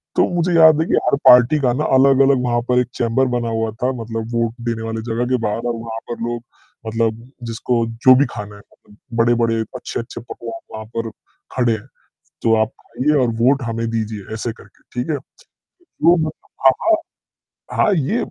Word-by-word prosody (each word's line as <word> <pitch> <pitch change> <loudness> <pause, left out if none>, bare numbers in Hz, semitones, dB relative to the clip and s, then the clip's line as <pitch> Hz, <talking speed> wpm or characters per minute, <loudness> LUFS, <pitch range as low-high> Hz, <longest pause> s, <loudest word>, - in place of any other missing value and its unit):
तो - - +4
मुझे 175 +1 +1
याद 160 -1 +7
है - - +1
कि - - +2
हर - - +3
पार्टी 125 +5 +7
का 125 -2 +2
ना 150 - -1
अलग-अलग 135 0 +5
वहाँ 120 -1 +1
पर 125 0 +4
एक 125 - 0
चेंबर 120 +3 +1
बना 120 -1 -1
हुआ 115 -1 -1
था, 125 +4 -1
मतलब 115 0 -5
वोट 115 -1 0 0.2
देने 115 -1 -3
वाले 115 0 -4
जगह 120 +2 0
के 125 - +3
बाहर 115 +3 -3
और 120 - -1
वहाँ 115 0 -6
पर 120 - -5
लोग 120 0 -4 0.4
मतलब 115 0 -1 0.2
जिसको 115 +1 0 0.2
जो 130 - +9
भी 140 +2 +4
खाना 105 -1 -7
है, 100 - -14 0.6
बड़े-बड़े, 115 -1 +3 0.2
अच्छे-अच्छे 115 -1 -6
पकवान 115 -1 -8
वहाँ 110 0 -6
पर 115 -1 -2 0.5
खड़े 120 -3 +2
हैं, 110 +3 -6 0.6
तो 115 -1 +4
आप 110 +3 -2 0.3
आइए 150 +4 +2
और 125 - +2
वोट 135 +3 +3
हमें 115 -1 -2
दीजिए 110 -2 -4
ऐसे 115 +1 -3
करके, - - -19
ठीक 125 +5 -2
है? 150 - +1 0.6
लोग 170 - +1 0.3
हाँ, 135 - +9
हाँ। 335 -1 +4 0.8
हाँ, 210 - +3
ये 170 - 0
120 Hz, 185 wpm, -19 LUFS, 115-130 Hz, 0.8 s, जो